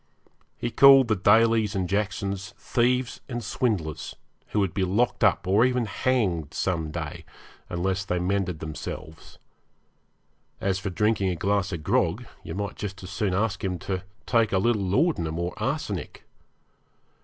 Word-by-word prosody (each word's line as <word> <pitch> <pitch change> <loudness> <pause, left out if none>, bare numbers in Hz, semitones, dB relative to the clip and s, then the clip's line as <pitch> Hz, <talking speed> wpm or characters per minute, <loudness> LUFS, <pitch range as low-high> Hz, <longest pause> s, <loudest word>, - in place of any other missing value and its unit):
He 120 - -3
called 135 -2 +7
the 110 - +3
Dalys 110 +2 +4
and 95 -2 0
Jacksons 100 0 -2
thieves 125 0 0
and 120 -2 -4
swindlers, 100 - -2 0.3
who 105 - -1
would 95 -4 0
be 95 - 0
locked 105 +7 +1
up, - - +3
or 100 +5 +4
even 125 -1 +2
hanged, 100 - 0
some 80 -4 -1
day, 75 - -5 0.5
unless 95 +2 -1
they 90 -2 -1
mended 90 -2 -1
themselves. 80 0 -7 1.2
As 95 -1 0
for 95 - -3
drinking 100 +1 +1
a 90 - -1
glass 100 +3 0
of 85 -4 -5
grog, - - +1 0.2
you 80 - -7
might 100 +1 -4
just 95 -2 -6
as 90 - -8
soon 100 -2 -1
ask 100 -1 -1
him 90 -2 -1
to 95 +2 -3 0.2
take 115 -2 +2
a 95 - +2
little 110 +2 +2
laudanum 95 - +1
or 85 +1 -2
arsenic. - - -3
100 Hz, 155 wpm, -26 LUFS, 90-110 Hz, 1.2 s, called